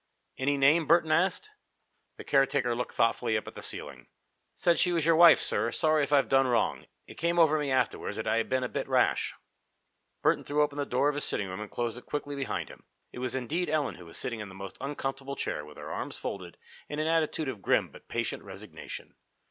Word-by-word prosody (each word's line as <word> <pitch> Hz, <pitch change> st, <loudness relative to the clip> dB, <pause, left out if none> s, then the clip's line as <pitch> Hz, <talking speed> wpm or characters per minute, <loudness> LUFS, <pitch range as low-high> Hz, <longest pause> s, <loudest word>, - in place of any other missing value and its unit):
"Any 140 Hz, +2 st, +1 dB
name?" 150 Hz, +4 st, +4 dB
Burton 165 Hz, -1 st, +4 dB
asked. 190 Hz, -, +1 dB, 0.7 s
The -, -, -8 dB
caretaker 135 Hz, -3 st, +2 dB
looked 125 Hz, +1 st, -4 dB
thoughtfully 115 Hz, -1 st, +2 dB
up 110 Hz, -, -5 dB
at -, -, -8 dB
the -, -, -9 dB
ceiling. 65 Hz, -4 st, -5 dB, 0.5 s
"Said 170 Hz, -1 st, +2 dB
she 180 Hz, -, +3 dB
was 165 Hz, -3 st, +1 dB
your 165 Hz, 0 st, +5 dB
wife, 170 Hz, +1 st, +9 dB
sir. 115 Hz, -, 0 dB
Sorry 155 Hz, +3 st, +2 dB
if 140 Hz, -, -3 dB
I've 140 Hz, -3 st, +4 dB
done 135 Hz, 0 st, +4 dB
wrong. 120 Hz, -2 st, 0 dB, 0.2 s
It -, -, -12 dB
came 170 Hz, +1 st, +1 dB
over 155 Hz, -2 st, +5 dB
me 145 Hz, -2 st, -1 dB
afterwards 130 Hz, -1 st, 0 dB
that -, -, -4 dB
I'd 115 Hz, 0 st, +1 dB
been 130 Hz, 0 st, +1 dB
a -, -, 0 dB
bit -, -, -4 dB
rash." -, -, +2 dB, 0.9 s
Burton -, -, +3 dB
threw 150 Hz, +1 st, +2 dB
open 145 Hz, -1 st, -2 dB
the 145 Hz, -, -1 dB
door 125 Hz, +3 st, +2 dB
of 150 Hz, -, +2 dB
his 145 Hz, -1 st, +1 dB
sitting 100 Hz, -, 0 dB
room 95 Hz, +3 st, -6 dB
and 105 Hz, -, -6 dB
closed 120 Hz, 0 st, -3 dB
it -, -, -21 dB
quickly 145 Hz, -1 st, -3 dB
behind 135 Hz, -1 st, -3 dB
him. -, -, -14 dB, 0.3 s
It -, -, -8 dB
was 130 Hz, +1 st, -2 dB
indeed 155 Hz, +7 st, -1 dB
Ellen 150 Hz, -2 st, 0 dB
who 90 Hz, -, -12 dB
was 85 Hz, -, -4 dB
sitting 115 Hz, -2 st, -2 dB
in 105 Hz, -2 st, -6 dB
the 95 Hz, -, -12 dB
most 95 Hz, 0 st, -8 dB
uncomfortable 135 Hz, 0 st, -4 dB
chair, 75 Hz, -, -3 dB
with 75 Hz, 0 st, -13 dB
her -, -, -7 dB
arms -, -, -4 dB
folded, 90 Hz, -3 st, -6 dB, 0.3 s
in 150 Hz, -, -4 dB
an 155 Hz, -, 0 dB
attitude 160 Hz, -1 st, +1 dB
of 120 Hz, -7 st, -5 dB
grim -, -, +2 dB
but -, -, -16 dB
patient -, -, -2 dB
resignation. -, -, -9 dB
135 Hz, 225 wpm, -29 LUFS, 120-155 Hz, 0.9 s, wife